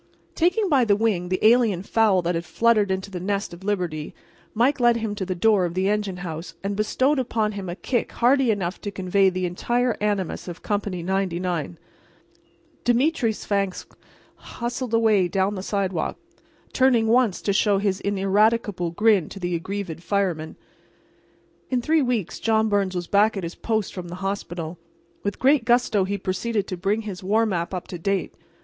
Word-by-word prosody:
Taking 365 +5 +2
by 280 -7 +4
the 210 -3 +3
wing 200 -5 0
the 185 - +1
alien 220 -5 +4
fowl 205 -4 +2
that 175 +1 0
had 165 0 -2
fluttered 210 +5 +2
into 190 +1 -3
the 180 - -5
nest 200 +1 -2
of 170 +2 -11
Liberty, 180 -7 -2 0.4
Mike 260 +6 +2
led 240 -1 +4
him 220 -2 -3
to 195 -3 -4
the 185 - -2
door 205 +1 +3
of 175 -1 -2
the 190 +1 +1
engine 205 -2 -1
house 165 0 -6
and 200 0 -2
bestowed 260 +7 +1
upon 220 -4 0
him 200 -3 -6
a 175 - -4
kick 240 +4 -2
hearty 260 +1 +3
enough 195 -4 -1
to 205 - -4
convey 190 0 +2
the 185 0 -2
entire 240 +7 0
animus 205 -4 -1
of 175 -1 -8
Company 200 -4 -2
99. 180 - -2 1.1
Demetre 250 +1 +2
Svangvsk 200 -3 -3 0.4
hustled 245 0 -5
away 215 -5 +3
down 190 +2 0
the 190 - -4
sidewalk, 190 -4 -2 0.6
turning 255 -4 +4
once 230 -3 +3
to 200 - -1
show 205 0 +3
his 195 -1 0
ineradicable 200 -1 +1
grin 200 -1 +2
to 195 - -9
the 175 -1 -2
aggrieved 180 -1 -4
firemen. 180 -5 -1 1.1
In 255 - +1
three 315 +6 +2
weeks 240 - -1
John 220 -1 +2
Byrnes 200 -2 0
was 175 -1 -2
back 205 +3 +3
at 190 - -4
his 170 +1 -4
post 220 -3 -2
from 180 -2 -6
the 175 - -7
hospital. 175 -4 -4 0.4
With 200 - -3
great 275 -1 +3
gusto 235 -5 +2
he 200 +1 -2
proceeded 200 +3 -2
to 185 - -4
bring 200 +5 0
his 195 -4 -7
war 215 +4 +2
map 175 -5 -2
up 185 -2 -5
to 175 - -6
date. 195 +3 -1
200 Hz, 180 wpm, -24 LUFS, 185-225 Hz, 1.1 s, by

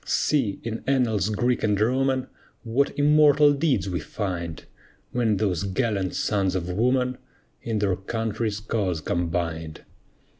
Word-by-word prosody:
See, 130 -10 0
in 115 0 -4
annals 115 -7 +2
Greek 120 +3 0
and 105 -2 +1
Roman, 130 +3 +1 0.4
What 125 +4 0
immortal 150 0 +5
deeds 135 - +1
we 90 -2 -2
find; 85 -1 -5 0.5
When 115 -4 +1
those 95 -4 0
gallant 100 -1 -1
sons 95 -3 0
of 90 -1 -2
woman 125 +5 +1 0.4
In 115 -2 -2
their 100 -3 +1
country's 110 +2 -3
cause 100 -6 -1
combined. 85 -2 -3
110 Hz, 125 wpm, -25 LUFS, 95-125 Hz, 0.5 s, immortal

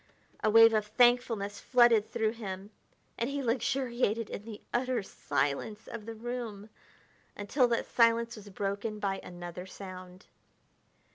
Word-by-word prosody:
A 215 - +4
wave 225 +1 +8
of 215 -1 +1
thankfulness 230 -3 +2
flooded 240 -4 +4
through 220 -1 0
him, 200 -3 -7 0.5
and 235 - 0
he 280 0 -3
luxuriated 235 -2 0
in 205 - -6
the 220 -2 -8
utter 250 -2 0
silence 145 +7 -2
of 225 -2 -8
the 225 - -5
room 225 -3 -6 0.7
until 245 +6 +2
that 235 -1 0
silence 230 0 +3
was 210 -2 -11
broken 200 +2 -3
by 195 -2 -2
another 175 +1 -8
sound. 185 -1 -10
220 Hz, 135 wpm, -30 LUFS, 200-235 Hz, 0.7 s, wave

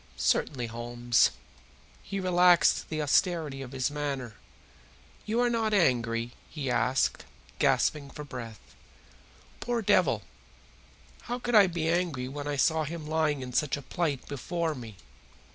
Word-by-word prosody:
"Certainly, 125 -5 +1
Holmes." 120 +1 +1 0.7
He 195 - -5
relaxed 180 -1 +4
the 155 -1 -2
austerity 150 -2 +1
of 130 -2 -8
his 130 +1 -1
manner. 140 -5 -3 0.9
"You 225 +3 0
are 245 - +3
not 220 -2 +1
angry?" 120 - +1 0.2
he 140 -5 -3
asked, 130 +2 +1 0.4
gasping 145 -2 +2
for 150 +2 -8
breath. 120 -6 -8 1.0
Poor 240 -2 -2
devil, - - +3 1.0
how 245 - -3
could 245 -1 -4
I 205 -3 +8
be 170 -2 -2
angry 165 -7 0
when 145 +2 -6
I 145 - -1
saw 160 +3 +2
him 160 +1 -6
lying 155 -3 0
in 125 -1 -7
such 150 +2 +1
a 145 - -9
plight 145 -3 -2
before 165 +4 -2
me? 115 -6 -9
145 Hz, 140 wpm, -28 LUFS, 130-175 Hz, 1.0 s, I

